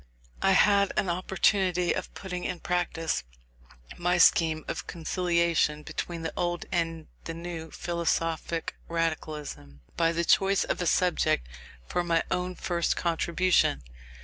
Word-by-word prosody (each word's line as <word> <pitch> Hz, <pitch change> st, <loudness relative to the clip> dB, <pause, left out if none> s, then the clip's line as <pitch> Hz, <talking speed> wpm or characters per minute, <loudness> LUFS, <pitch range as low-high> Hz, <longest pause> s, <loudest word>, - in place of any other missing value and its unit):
I 195 Hz, -, +4 dB
had 200 Hz, +1 st, +4 dB
an 185 Hz, -, +1 dB
opportunity 185 Hz, 0 st, +1 dB
of -, -, -4 dB
putting 180 Hz, -2 st, -5 dB
in 180 Hz, -, -3 dB
practice 175 Hz, -, -1 dB, 0.8 s
my 175 Hz, +1 st, +2 dB
scheme 160 Hz, -2 st, +4 dB
of 180 Hz, -, -4 dB
conciliation 170 Hz, -3 st, +1 dB
between 170 Hz, +2 st, -5 dB
the 160 Hz, -, -3 dB
old 175 Hz, -1 st, -1 dB
and 165 Hz, -2 st, -1 dB, 0.2 s
the 165 Hz, -, -5 dB
new 165 Hz, -1 st, -6 dB
"philosophic 165 Hz, 0 st, -2 dB
radicalism," 155 Hz, -, -3 dB, 0.2 s
by 165 Hz, 0 st, +3 dB
the 170 Hz, 0 st, -1 dB
choice 195 Hz, +1 st, +4 dB
of -, -, -2 dB
a 175 Hz, -, 0 dB
subject 175 Hz, -, +2 dB, 0.4 s
for 175 Hz, -, -1 dB
my 165 Hz, -1 st, +2 dB
own 180 Hz, 0 st, -1 dB
first 170 Hz, -1 st, 0 dB
contribution. 170 Hz, -, +2 dB
170 Hz, 130 wpm, -28 LUFS, 165-180 Hz, 0.8 s, I